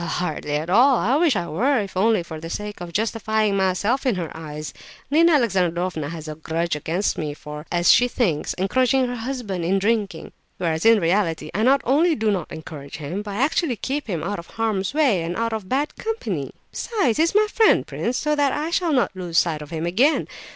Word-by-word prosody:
"Well, 170 Hz, -, -4 dB
hardly 155 Hz, -4 st, -2 dB
at 155 Hz, +2 st, -2 dB
all. 250 Hz, +9 st, +5 dB
I 240 Hz, +3 st, +1 dB
wish 320 Hz, -4 st, +3 dB
I 175 Hz, -, -1 dB
were, 245 Hz, -, +1 dB
if 200 Hz, -3 st, -5 dB
only 210 Hz, 0 st, +2 dB
for 160 Hz, -2 st, -8 dB
the 165 Hz, +1 st, -7 dB
sake 210 Hz, +2 st, -5 dB
of 175 Hz, -1 st, -6 dB
justifying 220 Hz, +1 st, 0 dB
myself 195 Hz, +7 st, +1 dB
in 255 Hz, -5 st, +1 dB
her 170 Hz, -4 st, -5 dB
eyes. 155 Hz, -1 st, -7 dB, 0.4 s
Nina 330 Hz, +3 st, +5 dB
Alexandrovna 180 Hz, -, 0 dB
has 160 Hz, -1 st, -7 dB
a 155 Hz, -, -4 dB
grudge 160 Hz, +2 st, -2 dB
against 165 Hz, +7 st, -1 dB
me 150 Hz, -2 st, -3 dB
for, 150 Hz, +1 st, -9 dB
as 175 Hz, 0 st, +4 dB
she 245 Hz, -, +4 dB
thinks, 195 Hz, -, -1 dB
encouraging 255 Hz, +7 st, +2 dB
her 245 Hz, 0 st, -3 dB
husband 225 Hz, -7 st, -4 dB
in 185 Hz, +4 st, +2 dB
drinking; 200 Hz, -4 st, -1 dB, 0.3 s
whereas 165 Hz, +2 st, 0 dB
in 225 Hz, -1 st, +6 dB
reality 165 Hz, -3 st, 0 dB
I 210 Hz, -, -1 dB
not 270 Hz, +4 st, +4 dB
only 315 Hz, +6 st, +3 dB
do 220 Hz, -1 st, +1 dB
not 185 Hz, -6 st, -3 dB
encourage 150 Hz, -3 st, -8 dB
him, 160 Hz, +7 st, -4 dB
but 205 Hz, -1 st, -6 dB
I 240 Hz, -, +1 dB
actually 300 Hz, -2 st, +1 dB
keep 275 Hz, +5 st, -3 dB
him 175 Hz, -7 st, -3 dB
out 200 Hz, +2 st, -3 dB
of 170 Hz, -, -10 dB
harm's 215 Hz, -4 st, -1 dB
way, 265 Hz, -, +3 dB
and 170 Hz, +2 st, -3 dB
out 230 Hz, 0 st, -1 dB
of 215 Hz, -4 st, -5 dB
bad 285 Hz, +3 st, -1 dB
company. 450 Hz, +2 st, -3 dB, 0.2 s
Besides, 350 Hz, -, 0 dB
he's 330 Hz, +4 st, +2 dB
my 425 Hz, 0 st, +5 dB
friend, 440 Hz, +1 st, +3 dB
prince, 245 Hz, +2 st, -2 dB
so 300 Hz, +2 st, 0 dB
that 285 Hz, -2 st, +2 dB
I 310 Hz, +3 st, -2 dB
shall 340 Hz, -2 st, +1 dB
not 250 Hz, -7 st, +1 dB
lose 175 Hz, -3 st, -3 dB
sight 160 Hz, -3 st, +2 dB
of 150 Hz, -, -9 dB
him, 160 Hz, 0 st, -3 dB
again. 240 Hz, -, +2 dB
200 Hz, 215 wpm, -22 LUFS, 170-255 Hz, 0.4 s, in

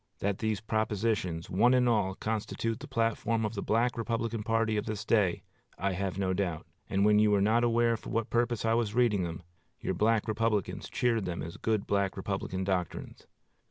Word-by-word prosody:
That 100 Hz, -1 st, -1 dB
these 110 Hz, -2 st, -1 dB
propositions, 110 Hz, -5 st, -1 dB
one 120 Hz, +7 st, +4 dB
and 125 Hz, -1 st, +3 dB
all, 105 Hz, -5 st, +1 dB
constitute 110 Hz, +1 st, -2 dB
the -, -, -9 dB
platform 115 Hz, -1 st, 0 dB
of 105 Hz, -, -2 dB
the 100 Hz, -, -3 dB
Black 120 Hz, +3 st, +1 dB
Republican 115 Hz, -1 st, -2 dB
party 115 Hz, 0 st, +1 dB
of 105 Hz, 0 st, -2 dB
this 110 Hz, 0 st, -4 dB
day, 100 Hz, -7 st, +2 dB, 0.3 s
I 100 Hz, +2 st, 0 dB
have 95 Hz, 0 st, -3 dB
no 95 Hz, -1 st, 0 dB
doubt; 90 Hz, -4 st, -2 dB, 0.2 s
and 100 Hz, +1 st, +2 dB
when 105 Hz, 0 st, +5 dB
you 105 Hz, 0 st, +4 dB
were 105 Hz, -1 st, +3 dB
not 110 Hz, +4 st, +3 dB
aware 120 Hz, 0 st, +3 dB
for -, -, -10 dB
what 115 Hz, -1 st, -1 dB
purpose 120 Hz, -2 st, +1 dB
I 115 Hz, -, +3 dB
was 115 Hz, -2 st, 0 dB
reading 120 Hz, -6 st, +3 dB
them, 85 Hz, -1 st, -4 dB, 0.4 s
your -, -, -2 dB
Black 110 Hz, 0 st, +2 dB
Republicans 110 Hz, -2 st, -1 dB
cheered 115 Hz, -4 st, +1 dB
them 90 Hz, -1 st, -3 dB
as 85 Hz, -, -7 dB
good 110 Hz, -3 st, 0 dB
Black 100 Hz, -1 st, 0 dB
Republican 95 Hz, 0 st, -3 dB
doctrines. 95 Hz, -3 st, -3 dB
110 Hz, 195 wpm, -30 LUFS, 100-115 Hz, 0.4 s, when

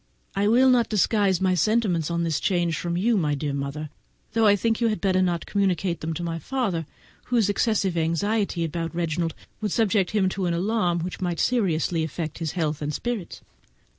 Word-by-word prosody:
I 200 Hz, +1 st, +2 dB
will 255 Hz, +4 st, +5 dB
not 240 Hz, -3 st, +3 dB
disguise 205 Hz, -3 st, +2 dB
my 190 Hz, -1 st, +2 dB
sentiments 180 Hz, -3 st, +1 dB
on 170 Hz, 0 st, -1 dB
this 165 Hz, -3 st, 0 dB
change 175 Hz, -4 st, +1 dB
from 170 Hz, +1 st, -2 dB
you, 225 Hz, +4 st, +2 dB
my 150 Hz, -5 st, +1 dB
dear 145 Hz, 0 st, -3 dB
mother, 140 Hz, +2 st, -4 dB, 0.4 s
though 225 Hz, -1 st, +4 dB
I 205 Hz, -, +6 dB
think 225 Hz, +3 st, 0 dB
you 235 Hz, -, +4 dB
had 215 Hz, -1 st, -1 dB
better 185 Hz, -2 st, +2 dB
not 175 Hz, -2 st, 0 dB
communicate 190 Hz, -3 st, 0 dB
them 160 Hz, -, -3 dB
to 175 Hz, -, -4 dB
my 165 Hz, -1 st, -3 dB
father, 195 Hz, -, -2 dB, 0.4 s
whose 230 Hz, -5 st, +2 dB
excessive 205 Hz, -3 st, +1 dB
anxiety 170 Hz, +3 st, 0 dB
about 165 Hz, +1 st, -4 dB
Reginald 165 Hz, -1 st, -1 dB, 0.3 s
would 210 Hz, -2 st, -1 dB
subject 205 Hz, -4 st, +2 dB
him 205 Hz, -3 st, +2 dB
to 190 Hz, -1 st, -2 dB
an 170 Hz, -, 0 dB
alarm 180 Hz, -2 st, 0 dB
which 180 Hz, +3 st, -5 dB
might 175 Hz, -2 st, -2 dB
seriously 175 Hz, -8 st, +1 dB
affect 160 Hz, 0 st, -4 dB
his 160 Hz, -3 st, -3 dB
health 155 Hz, -4 st, -1 dB
and 150 Hz, 0 st, -2 dB
spirits. 225 Hz, +2 st, -4 dB
180 Hz, 195 wpm, -25 LUFS, 165-210 Hz, 0.4 s, I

